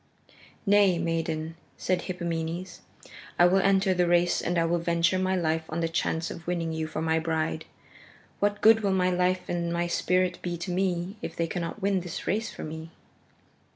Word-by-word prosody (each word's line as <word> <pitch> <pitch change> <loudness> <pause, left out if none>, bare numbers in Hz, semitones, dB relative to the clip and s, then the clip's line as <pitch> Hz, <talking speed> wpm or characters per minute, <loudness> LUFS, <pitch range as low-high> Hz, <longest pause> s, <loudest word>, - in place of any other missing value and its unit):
"Nay, 200 -3 +5
maiden," 165 -1 -2 0.2
said 185 -1 0
Hippomenes, 170 0 -4 0.6
"I 175 - +6
will 185 +2 +4
enter 195 0 +3
the 180 -1 +2
race 175 0 +3
and 175 0 -1
I 165 - +3
will 170 +1 +1
venture 170 +2 +1
my 185 0 +1
life 160 -2 0
on 160 - -3
the 165 - +1
chance 165 0 -1
of 170 - -9
winning 170 -2 -1
you 160 0 -2
for 155 0 -4
my 160 0 +2
bride. 160 0 -2 0.7
What 205 0 0
good 220 0 +7
will 200 -3 +1
my 185 -1 +2
life 180 +1 +1
and 170 -1 -2
my 170 0 0
spirit 180 +1 +1
be 175 -1 -3
to 175 +2 -5
me 185 +1 -1
if - - -5
they 165 - 0
cannot 170 +4 -4
win 195 -1 +2
this 175 -2 -6
race 215 +5 0
for - - -8
me?" 160 +1 -7
175 Hz, 190 wpm, -27 LUFS, 165-185 Hz, 0.7 s, good